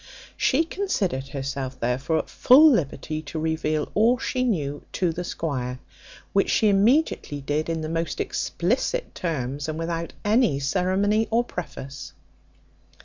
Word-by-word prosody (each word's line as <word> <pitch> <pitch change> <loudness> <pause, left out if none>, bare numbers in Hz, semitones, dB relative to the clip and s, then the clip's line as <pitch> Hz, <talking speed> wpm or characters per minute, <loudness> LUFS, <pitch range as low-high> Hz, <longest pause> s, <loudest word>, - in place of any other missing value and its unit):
She 285 +5 +2
considered 205 - -2
herself, 135 -1 -4
therefore, 125 +7 0
at - - -2
full 295 +5 +7
liberty 155 - -1
to 160 - -7
reveal 155 -1 -1
all 230 +4 +4
she 255 0 -2
knew 145 - -1
to 180 -3 +1
the 175 +2 -4
squire, 130 -8 -3 0.6
which 195 - +2
she 215 - +3
immediately 205 - +2
did 145 +3 -2
in 165 -1 -1
the 155 - -3
most 165 -1 -2
explicit 255 - -1
terms, 145 -3 -3
and 155 - -3
without 165 0 -3
any 215 - +3
ceremony 190 +8 +1
or 230 +2 +2
preface. 140 - -7
165 Hz, 140 wpm, -25 LUFS, 140-215 Hz, 0.6 s, full